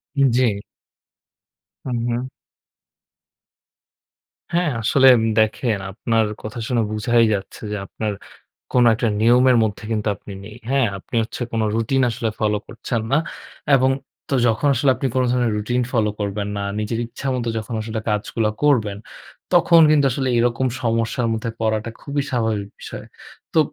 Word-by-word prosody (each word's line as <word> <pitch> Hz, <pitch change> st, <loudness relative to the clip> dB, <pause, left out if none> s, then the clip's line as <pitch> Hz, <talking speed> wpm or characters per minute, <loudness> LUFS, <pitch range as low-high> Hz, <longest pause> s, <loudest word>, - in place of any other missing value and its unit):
হুম, 140 Hz, -1 st, +4 dB
জি। 110 Hz, -6 st, +2 dB, 1.3 s
হুম, 125 Hz, -3 st, -2 dB
হুম। 120 Hz, +2 st, -2 dB, 2.3 s
হ্যাঁ, 175 Hz, -1 st, +2 dB
আসলে 130 Hz, +4 st, +4 dB, 0.3 s
দেখেন 110 Hz, 0 st, +1 dB
আপনার 115 Hz, +2 st, +1 dB, 0.2 s
কথা 110 Hz, +2 st, -6 dB
শুনে 120 Hz, -3 st, +1 dB
বুঝাই 115 Hz, +2 st, +3 dB
যাচ্ছে 95 Hz, -1 st, -5 dB
যে 105 Hz, -, -2 dB
আপনার 105 Hz, +2 st, -4 dB, 0.6 s
কোন 125 Hz, -1 st, +5 dB
একটা 115 Hz, +1 st, 0 dB
নিয়মের 125 Hz, +2 st, +5 dB
মধ্যে 110 Hz, 0 st, -3 dB
কিন্তু 110 Hz, -1 st, -1 dB
আপনি 100 Hz, -, -11 dB
নেই। 105 Hz, +2 st, -10 dB
হ্যাঁ, 135 Hz, -3 st, +3 dB
আপনি 100 Hz, -, -9 dB
হচ্ছে 120 Hz, +3 st, -8 dB
কোন 115 Hz, -1 st, -1 dB
রুটিন 120 Hz, +4 st, +1 dB
আসলে 115 Hz, 0 st, -2 dB
ফলো 105 Hz, -1 st, +1 dB
করছেন 115 Hz, -3 st, -3 dB
না। 135 Hz, -, +4 dB, 0.6 s
এবং 130 Hz, 0 st, +3 dB, 0.4 s
তো -, -, -1 dB
যখন 115 Hz, +5 st, +1 dB
আসলে 135 Hz, +3 st, +2 dB
আপনি 135 Hz, -, -1 dB
কোন 130 Hz, -, +3 dB
ধরনের 120 Hz, -3 st, +1 dB
রুটিন 120 Hz, +4 st, 0 dB
ফলো 110 Hz, -5 st, +2 dB
করবেন 100 Hz, 0 st, -2 dB
না। 100 Hz, -, -2 dB, 0.2 s
নিজের 110 Hz, +2 st, -2 dB
ইচ্ছা 135 Hz, +3 st, -7 dB
মত 125 Hz, -2 st, -2 dB
যখন 110 Hz, +2 st, -5 dB
আসলে 110 Hz, 0 st, -4 dB
কাজগুলো 105 Hz, +1 st, 0 dB
করবেন। 110 Hz, -9 st, +2 dB, 0.6 s
তখন 170 Hz, -1 st, +6 dB
কিন্তু 145 Hz, -2 st, +4 dB
আসলে 130 Hz, +2 st, -1 dB
এরকম 120 Hz, +2 st, +1 dB
সমস্যার 115 Hz, 0 st, 0 dB
মধ্যে 110 Hz, +1 st, -3 dB
পড়াটা 110 Hz, 0 st, 0 dB
খুবই 145 Hz, 0 st, -2 dB
স্বাভাবিক 110 Hz, -4 st, -1 dB
বিষয়। -, -, -8 dB, 0.5 s
তো 160 Hz, -, +4 dB
115 Hz, 150 wpm, -21 LUFS, 110-130 Hz, 2.3 s, তখন